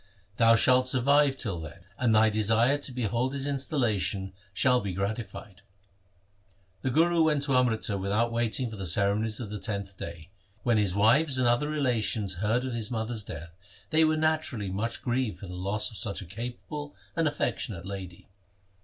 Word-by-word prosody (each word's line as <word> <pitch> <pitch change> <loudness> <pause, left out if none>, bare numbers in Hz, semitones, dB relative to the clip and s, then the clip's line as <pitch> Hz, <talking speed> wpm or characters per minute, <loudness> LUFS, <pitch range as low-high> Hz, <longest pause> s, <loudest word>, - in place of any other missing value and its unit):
Thou 115 -1 +6
shalt 130 +2 +4
survive 140 +2 +3
till 100 -10 -3
then, 80 +1 -9 0.2
and 120 -3 +3
thy 110 0 +5
desire 115 +6 +3
to 140 - -4
behold 125 +2 -1
his 135 0 -2
instal 140 +1 -2
lation 100 -4 0 0.2
shall 125 +5 +3
be 100 -3 -4
gratified.' 100 0 -5 1.2
The 130 - -1
Guru 165 +5 +3
went 150 -3 +2
to 140 -2 +1
Amritsar 110 -5 +1
without 105 +5 0
waiting 115 0 0
for 110 - -7
the 95 -2 -4
ceremonies 105 +4 +1
of 110 -5 -6
the 105 - -4
tenth 100 -2 -4
day. 85 0 -8 0.3
When 120 -3 +3
his 100 -3 +1
wives 130 +8 +4
and 130 -1 +2
other 120 +5 +2
relations 115 -9 0
heard 115 +5 +1
of 130 - -3
his 115 -3 -4
mother's 110 -1 -2
death, 85 -4 -8 0.4
they 160 +1 +5
were 155 0 +3
naturally 155 -10 0
much 110 +5 -3
grieved 120 -3 -1
for - - -9
the 90 - -8
loss 100 +5 +1
of 110 - -5
such 100 +2 +2
a 95 - -7
capable 125 - -7 0.2
and 165 -1 +2
affectionate 115 -10 -2
lady. 95 -3 -8
115 Hz, 180 wpm, -28 LUFS, 100-130 Hz, 1.2 s, Thou